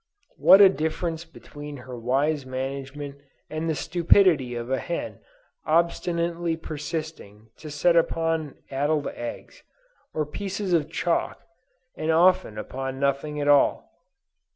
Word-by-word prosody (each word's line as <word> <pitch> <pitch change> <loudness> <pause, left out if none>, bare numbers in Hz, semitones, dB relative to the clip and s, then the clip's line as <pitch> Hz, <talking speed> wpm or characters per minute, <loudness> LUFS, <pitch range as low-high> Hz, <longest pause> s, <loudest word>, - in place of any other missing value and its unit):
What 195 - +8
a 195 - +10
difference 165 0 -2
between 145 -3 -10
her 130 -1 -7
wise 135 +5 0
management 135 +2 -5 0.3
and 155 +1 -2
the 160 - 0
stupidity 165 -4 +3
of 120 +2 -5
a 130 - +1
hen 170 - -4 0.4
obstinately 170 0 0
persisting 150 -9 -6
to 155 - -9
set 150 +4 +2
upon 165 -2 +1 0.2
addled 145 +2 0
eggs, 120 - -8 0.5
or 155 - -1
pieces 195 +4 -4
of 160 -3 +2
chalk, 170 +1 -1 0.5
and 155 - -3
often 175 -7 +3
upon 135 +4 -5
nothing 140 +2 -1
at 145 - -1
all. 145 -1 +3
155 Hz, 125 wpm, -25 LUFS, 135-170 Hz, 0.5 s, a